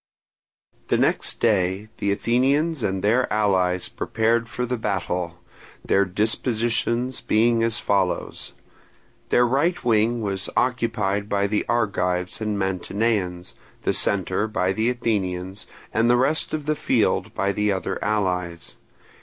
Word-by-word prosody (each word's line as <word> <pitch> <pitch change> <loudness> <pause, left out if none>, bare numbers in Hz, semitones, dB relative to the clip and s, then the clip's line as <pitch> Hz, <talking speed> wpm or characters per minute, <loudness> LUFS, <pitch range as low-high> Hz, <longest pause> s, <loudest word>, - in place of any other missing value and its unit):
The - - +2
next - - 0
day 100 -1 +1
the 100 - 0
Athenians 135 +9 +1
and 95 -3 -1
their 120 +5 +2
allies 95 -4 +1
prepared 115 +1 0
for 125 - -2
battle, 90 -7 -2 0.5
their 100 +1 +3
dispositions 115 +4 0
being 115 +1 +2
as 115 0 +1
follows: 95 -6 -1 0.8
Their 120 - +4
right 145 +8 +1
wing 115 0 +2
was 95 -2 -2
occupied 115 -5 0
by 100 0 +1
the 105 +1 -1
Argives 90 -6 0
and 105 -1 -1
Mantineans, 95 -1 -1 0.3
the - - +1
centre 100 +1 +1
by 95 -3 0
the 110 +4 +1
Athenians, 95 -5 -2 0.3
and 115 +2 +3
the 120 - +5
rest 140 +5 +1
of 155 -2 -3
the 155 - +1
field - - 0
by 100 0 +1
the 105 +1 0
other 95 -1 -3
allies. 90 -5 -2
105 Hz, 130 wpm, -23 LUFS, 95-120 Hz, 0.8 s, the